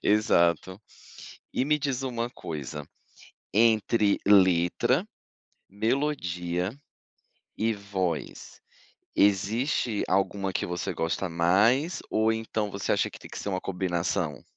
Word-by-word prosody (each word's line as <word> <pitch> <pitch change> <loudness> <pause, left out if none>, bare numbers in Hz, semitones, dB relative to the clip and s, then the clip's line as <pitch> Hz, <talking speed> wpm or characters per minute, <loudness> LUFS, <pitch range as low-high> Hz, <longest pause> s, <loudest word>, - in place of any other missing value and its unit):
Exato. 95 -3 +2 0.7
E 130 - +1
me 150 +1 +3
diz 135 -2 -2
uma 120 -2 -2
coisa, 75 - -6 0.7
entre 110 -1 +3
letra, 95 -4 +4 0.7
melodia 100 - -1 0.9
e 110 +2 +1
voz, 95 -6 -4 0.5
existe 105 +3 +1
alguma 95 0 0
que - - -1
você 90 -1 -3
gosta 85 +3 -1
mais 100 - +2
ou 110 +1 +2
então 110 -1 -2
você 100 0 -2
acha - - +1
que - - -12
tem - - -12
que - - -8
ser - - -4
uma 95 -1 -2
combinação? 85 -4 -2
100 Hz, 110 wpm, -27 LUFS, 90-110 Hz, 0.9 s, letra